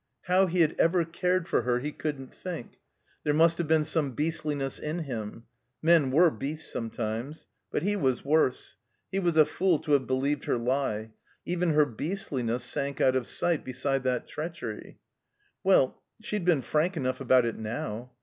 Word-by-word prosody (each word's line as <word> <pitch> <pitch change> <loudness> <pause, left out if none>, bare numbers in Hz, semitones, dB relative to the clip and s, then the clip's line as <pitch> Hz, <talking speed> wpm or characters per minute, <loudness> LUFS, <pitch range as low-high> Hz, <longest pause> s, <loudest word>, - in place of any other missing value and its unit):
How 185 +1 +3
he 175 0 +1
had 160 -1 +3
ever 170 0 +3
cared 180 +1 0
for - - +2
her 120 +1 +1
he 145 +4 -3
couldn't 145 -4 -5
think. 170 -9 -7 0.4
There 150 -1 +1
must 165 +2 +4
have 170 - -1
been 160 0 +4
some 150 -3 -1
beastliness 150 -2 -2
in 160 +3 -3
him. 115 -5 -6 0.4
Men 160 -4 +4
were 165 +5 +5
beasts 150 +3 -5
sometimes. 115 +5 -4 0.2
But - - -2
he 205 +2 +1
was 135 -10 0
worse. 140 -7 +1 0.3
He 195 - 0
was 175 -4 +1
a 155 - +8
fool 180 0 +2
to 150 - -4
have 140 -3 +3
believed 135 +2 0
her - - +1
lie. 120 -3 -1 0.3
Even 175 -2 0
her 150 -1 +6
beastliness 125 - -3
sank 140 +2 -2
out 130 0 +4
of 130 -2 0
sight 170 -3 0
beside 135 +1 -1
that 125 -2 0
treachery. 150 -9 -6 0.7
Well 185 -9 +3
— - - -55
she'd 210 -5 -2
been 165 -7 +3
frank 160 +8 0
enough 130 -2 -2
about 130 -2 +4
it 115 - -3
now. 110 +2 -5
145 Hz, 180 wpm, -28 LUFS, 130-170 Hz, 0.7 s, a